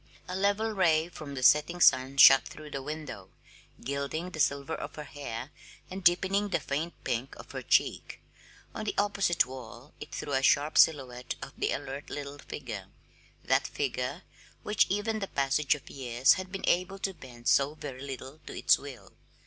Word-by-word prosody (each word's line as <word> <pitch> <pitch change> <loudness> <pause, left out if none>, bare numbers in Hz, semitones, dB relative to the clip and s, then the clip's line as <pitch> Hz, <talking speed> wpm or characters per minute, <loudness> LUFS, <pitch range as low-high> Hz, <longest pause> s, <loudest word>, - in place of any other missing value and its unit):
A 180 - -4
level 200 +3 +1
ray 170 -5 +2
from 145 -4 -8
the 130 - -4
setting 150 +7 +4
sun 130 -3 +4
shot 135 -1 +8
through 150 -1 -11
the 135 - -4
window, 145 -10 -7 0.5
gilding 140 +7 -3
the 160 - -8
silver 140 -1 +1
of - - -6
her 150 - -6
hair 140 -3 -7 0.4
and 190 0 -6
deepening 190 +4 +3
the 190 - +1
faint 155 +5 -3
pink 120 +3 -3
of - - -12
her - - -5
cheek; - - +1 0.5
on - - -5
the 205 - -2
opposite 200 -7 +2
wall 130 +1 -11
it - - -9
threw 145 - -5
a 135 - +2
sharp 145 +3 +3
silhouette 125 -5 +2
of - - -9
the - - -1
alert 135 +2 -5
little 145 0 -6
figure 110 -10 -7 0.6
that - - +2
figure 135 +4 -3 0.4
which 210 -1 +2
even 215 +3 -1
the 195 - -3
passage 140 0 +1
of 145 - -13
years 125 -1 +3
had 185 0 -6
been 195 0 -4
able 180 +2 +1
to 195 0 -2
bend 120 -7 -11
so 140 +2 +3
very 135 -4 -8
little 135 +1 -7
to - - -7
its - - +4
will. 140 -4 -11
145 Hz, 180 wpm, -29 LUFS, 130-175 Hz, 0.6 s, shot